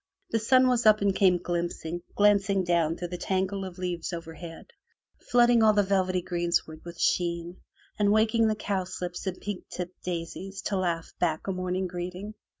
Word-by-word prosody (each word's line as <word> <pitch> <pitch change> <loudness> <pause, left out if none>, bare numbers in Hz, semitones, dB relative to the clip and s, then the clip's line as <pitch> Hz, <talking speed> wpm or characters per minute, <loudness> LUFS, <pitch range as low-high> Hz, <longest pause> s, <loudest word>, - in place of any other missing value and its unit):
The 225 - +2
sun 255 +4 +4
was 245 -3 +2
up 215 -1 +6
and 200 -1 +2
came 185 -3 +4
glimpsing, 175 -1 -3
glancing 200 -1 +3
down 170 -2 +1
through 175 0 -5
the 180 0 -5
tangle 190 +1 -1
of 185 -1 -7
leaves 180 -2 -3
overhead, 165 0 -8 0.6
flooding 240 -1 +5
all 215 -1 +6
the 205 -1 +3
velvety 185 -2 +1
greensward 170 -3 -1
with 170 -1 -10
sheen, 170 0 0 0.4
and 205 -1 +4
waking 220 +1 +3
the 215 - +1
cowslips 185 -3 -4
and 185 -1 -3
pink 205 -3 -5
tipped 180 0 -6
daisies 180 +2 -5
to 200 - -1
laugh 170 -3 -2
back 160 -3 0
a 195 - -1
morning 185 0 -2
greeting. 180 +3 -5
185 Hz, 170 wpm, -27 LUFS, 175-205 Hz, 0.6 s, up